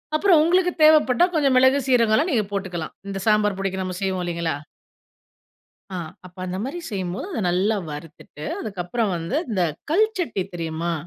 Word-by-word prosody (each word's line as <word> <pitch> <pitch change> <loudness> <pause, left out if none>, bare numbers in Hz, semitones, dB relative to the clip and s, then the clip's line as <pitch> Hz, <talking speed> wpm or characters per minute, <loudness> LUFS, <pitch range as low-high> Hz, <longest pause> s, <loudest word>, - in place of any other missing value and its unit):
அப்புறம், 350 -1 +5
உங்களுக்கு 360 +2 +3
தேவைப்பட்டா, 305 -1 +6
கொஞ்சம் 280 -5 +3
மிளகு 260 +2 +5
சீரகலாம், 245 +5 +3
நீங்க 225 -5 +2
போட்டுக்கலாம். 185 -5 -4 0.2
இந்த 195 - -4
சாம்பார் 210 -2 +3
பொடிக்கு, 190 -1 -2
நம்ம 185 0 -4
செய்வோம். 190 -2 -1
இல்லைங்களா? 170 -3 -2 1.3
அ, 190 - -6 0.3
அப்ப 180 0 -14
அந்த 185 0 -4
மாரி 275 +8 -4
செய்யும்போது, 190 - -3
அத - - -2
நல்லா 200 +5 +1
வறுத்துட்டு, 150 0 -9
அதுக்கப்புறம் 200 +1 -2
வந்து, 170 - -2
இந்த 190 -4 +1 0.3
கல் 425 +7 +4
சட்டி 250 - -1
தெரியுமா? 165 0 -3
200 Hz, 150 wpm, -23 LUFS, 180-260 Hz, 1.3 s, தேவைப்பட்டா